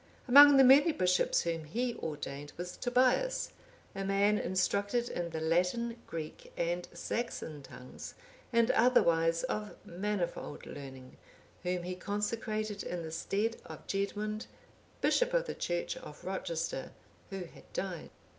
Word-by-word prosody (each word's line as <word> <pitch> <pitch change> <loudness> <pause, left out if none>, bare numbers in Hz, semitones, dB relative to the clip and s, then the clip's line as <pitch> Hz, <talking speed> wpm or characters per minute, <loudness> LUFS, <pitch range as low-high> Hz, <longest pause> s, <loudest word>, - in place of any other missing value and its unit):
Among 285 +2 +10
the 270 - +8
many 280 +5 +7
bishops 180 -4 +2
whom 165 -2 -2
he 240 +10 -1
ordained 145 -4 -6
was 180 +1 -5
Tobias,(812) 255 - 0
a - - -2
man 200 +2 +3
instructed 200 +5 0
in 175 -1 -3
the 160 -1 -4
Latin, 180 +9 +1
Greek, 160 -2 -7
and 175 +1 -1
Saxon 170 -5 -4
tongues, 125 -1 -10 0.4
and 235 0 +4
otherwise 165 -9 +4
of 215 -5 -3
manifold 180 -4 -3
learning, 130 -2 -10 0.4
whom 180 0 -1
he 180 +1 -3
consecrated 210 +2 -2
in 175 -1 -4
the 160 - -6
stead 205 +7 -1
of - - -10
Gedmund, 210 +2 -2 0.5
bishop - - +2
of - - +2
the - - -4
Church 175 0 -2
of 150 - -11
Rochester, 165 -6 -3 0.4
who 195 -1 -4
had 170 - -15
died. 180 -4 -4
195 Hz, 135 wpm, -32 LUFS, 170-230 Hz, 0.5 s, Among